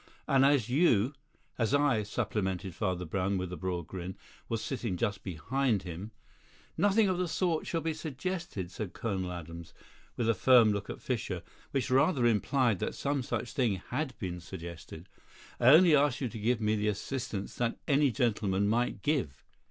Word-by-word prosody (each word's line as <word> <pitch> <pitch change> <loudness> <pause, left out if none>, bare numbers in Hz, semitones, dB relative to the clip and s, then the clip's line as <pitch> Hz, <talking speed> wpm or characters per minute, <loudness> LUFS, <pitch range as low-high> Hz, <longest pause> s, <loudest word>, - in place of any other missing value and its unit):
And 135 -1 +4
as 135 -5 +4
you 130 - +3 0.2
" - - -38
"As 115 +4 +2
I," 145 -6 +3
supplemented 100 -4 -2
Father 90 -2 -2
Brown, 95 +3 -1
with 90 -1 -4
a - - -3
broad 90 -2 -3
grin, 95 +1 -6 0.3
"was 115 - -1
sitting 115 -8 -3
just 105 -2 -1
behind 105 - 0
him 90 +4 -6 0.3
" - - -29 0.2
"Nothing 205 +1 +3
of 185 -1 0
the 180 - 0
sort 170 -1 0
shall 165 - -1
be 160 0 -1
suggested," 155 - -4
said 95 0 -5
Colonel 95 -6 -3
Adams, 85 -1 -8 0.4
with 120 - 0
a 115 - +4
firm 115 0 +6
look 100 - -4
at - - -7
Fischer, - - -2 0.3
which 135 -2 -1
rather 130 0 +3
implied 120 -1 +2
that - - -3
some 140 -1 -1
such 120 - -3
thing 125 -8 +1 0.2
had 135 -1 -2
been 90 -3 -4
suggested. 85 -1 -9 0.5
"I 120 - +3
only 160 +3 +8
ask 145 -3 +2
you 130 - -2
to 110 - -7
give 115 +2 +1
me 110 0 +1
the 105 0 0
assistance 105 0 -3
that 120 -1 0
any 140 0 +4
gentleman 105 -6 +1
might 120 +3 0
give." 135 - -1
115 Hz, 180 wpm, -31 LUFS, 95-135 Hz, 0.5 s, only